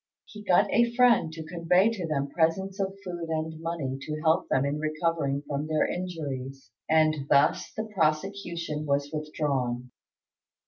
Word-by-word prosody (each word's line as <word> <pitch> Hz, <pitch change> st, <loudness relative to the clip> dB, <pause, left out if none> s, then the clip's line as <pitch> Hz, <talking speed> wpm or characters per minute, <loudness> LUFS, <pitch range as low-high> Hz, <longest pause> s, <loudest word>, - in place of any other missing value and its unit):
He 210 Hz, -, -11 dB
got 185 Hz, -3 st, +4 dB
a 235 Hz, 0 st, +3 dB
friend 235 Hz, -10 st, +4 dB
to 160 Hz, 0 st, -7 dB
convey 180 Hz, +5 st, +3 dB
to 185 Hz, -7 st, -4 dB
them 140 Hz, -3 st, -1 dB
presents 190 Hz, +5 st, 0 dB
of 195 Hz, 0 st, -2 dB
food 175 Hz, -2 st, -5 dB
and 160 Hz, 0 st, -3 dB
money 155 Hz, -6 st, -3 dB
to 155 Hz, +1 st, -4 dB
help 160 Hz, +3 st, +2 dB
them 135 Hz, +1 st, +2 dB
in 145 Hz, +1 st, -1 dB
recovering 155 Hz, -2 st, -1 dB
from 145 Hz, +1 st, -2 dB
their 155 Hz, -1 st, +2 dB
injuries, 140 Hz, -8 st, -5 dB, 0.2 s
and 155 Hz, -3 st, +3 dB
thus 140 Hz, +2 st, +3 dB
the 220 Hz, -, -1 dB
prosecution 170 Hz, -2 st, -1 dB
was 140 Hz, 0 st, 0 dB
withdrawn. 135 Hz, -5 st, -2 dB
160 Hz, 150 wpm, -27 LUFS, 145-175 Hz, 0.2 s, got